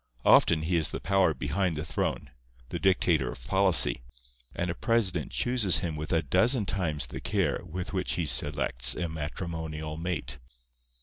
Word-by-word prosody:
Often 80 -1 +5
he 85 +2 +1
is 80 - 0
the - - -5
power 95 +2 +2
behind 95 -5 -2
the 75 - -4
throne, 80 - -3 0.4
the - - -4
dictator 85 -8 +2
of - - -11
policy; 95 -10 +3 0.5
and 85 0 -2
a - - -3
president 95 - 0
chooses 115 -9 +2
him 85 -3 -3
with 75 0 -5
a 80 0 +2
dozen 115 +4 +2
times 80 -6 -1
the - - -8
care - - 0
with 90 +4 -6
which 95 -1 -1
he 85 - -1
selects 65 -4 +1
a 85 - -2
matrimonial 80 0 -5
mate. 80 -8 -4
85 Hz, 165 wpm, -28 LUFS, 75-95 Hz, 0.5 s, Often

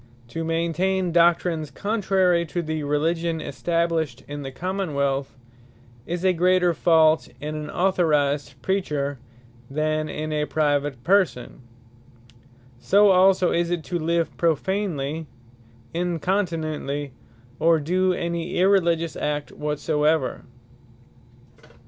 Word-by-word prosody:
To 165 +7 -4
maintain 170 +3 0
doctrines 170 -2 +2
contrary 190 -4 +1
to 175 +2 -3
the 155 0 -3
Religion 160 +3 0
established 165 +1 -1
in 145 0 -6
the 135 -1 -6
Common 185 +2 -3
wealth, 140 -1 -1 0.7
is 175 +2 -3
a 185 - +4
greater 180 0 +3
fault, 160 -1 +3
in 150 +1 -5
an 155 0 -5
authorised 150 -7 +1
Preacher, 145 -7 -1 0.5
than 155 +2 -1
in 155 +1 -4
a 150 0 0
private 145 -3 0
person: 180 -10 +1 1.2
So 200 +7 +5
also 185 -1 +4
is 170 0 +1
it, 175 -2 -2
to 175 +1 -3
live 165 +1 0
prophanely, 165 -3 -1 0.7
incontinently, 165 -5 -2 0.5
or 165 +1 +4
do 185 +5 +1
any 170 0 -3
irreligious 170 -4 +2
act 150 -1 -3
whatsoever. 150 0 0
165 Hz, 105 wpm, -24 LUFS, 150-180 Hz, 1.2 s, So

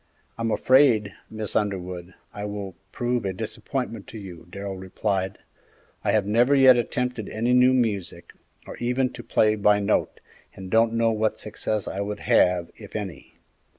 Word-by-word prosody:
"I'm 115 0 -2
afraid, 120 -5 +4 0.2
Miss 110 -2 -5
Underwood, 90 -3 -2 0.2
I 105 - -6
will 100 -2 -5 0.2
prove 120 -1 -1
a 95 -1 -2
disappointment 115 +2 -5
to - - -9
you," 90 -5 -10
Darrell 100 +1 -6
replied; 95 0 -2 0.7
"I - - +2
have 105 -3 +2
never 120 +7 +3
yet 130 -2 +8
attempted 120 -2 -2
any 115 +3 0
new 125 +1 +6
music, 105 -9 -1 0.3
or - - -9
even 125 +2 0
to - - -8
play 110 -2 +2
by 105 -1 +3
note, 100 +1 0 0.4
and 95 -1 -9
don't 115 0 +4
know 115 0 +2
what 110 0 0
success 105 0 -3
I 95 - -3
would 105 +1 -4
have, 90 -2 +3
if - - -12
any. - - -6
105 Hz, 160 wpm, -25 LUFS, 100-120 Hz, 0.7 s, yet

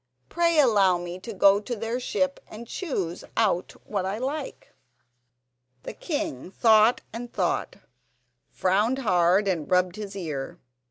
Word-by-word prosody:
Pray 335 -1 +2
allow 200 -9 +4
me 175 +1 -7
to 225 - -8
go 200 0 +5
to 240 +4 -5
their 225 +3 -3
ship 275 +2 -1
and 225 +2 -10
choose 195 - -4
out 200 -6 +1
what 200 -3 -2
I 190 +3 -2
like." 275 +4 -5 1.1
The - - -6
king 205 - -4
thought 220 +2 +4
and 235 +1 -7
thought, - - -1 0.7
frowned 210 +7 +1
hard 185 -4 +2
and 170 -6 -1
rubbed 180 +1 +2
his 205 -2 -7
ear. 155 -8 -5
205 Hz, 140 wpm, -26 LUFS, 185-240 Hz, 1.1 s, go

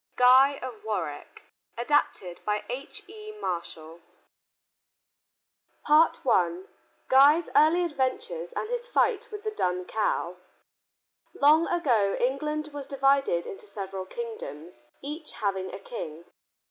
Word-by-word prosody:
GUY 260 +3 +6
OF 250 -4 -7
WARWICK 220 -1 -5 0.3
ADAPTED 235 -8 0
BY 210 0 -1
H.E. 425 - -8
MARSHALL 170 - -5 1.9
I 230 - +3 0.4
GUY'S 290 +5 +5
EARLY 325 +4 +5
ADVENTURES 255 - -3
AND 435 - -4
HIS 485 0 -3
FIGHT - - +1
WITH 420 -1 -7
THE 430 - -2
DUN 180 - -1
COW 180 -4 -1 1.0
Long 310 +4 +5
ago 240 - +1
England 300 +4 -1
was 285 -2 -6
divided 275 -10 +2
into 205 - -8
several 195 -2 -6
kingdoms, 180 - -8 0.2
each 300 +2 -6
having 195 -2 -2
a - - -6
king. 170 -6 -8
260 Hz, 110 wpm, -27 LUFS, 190-310 Hz, 1.9 s, GUY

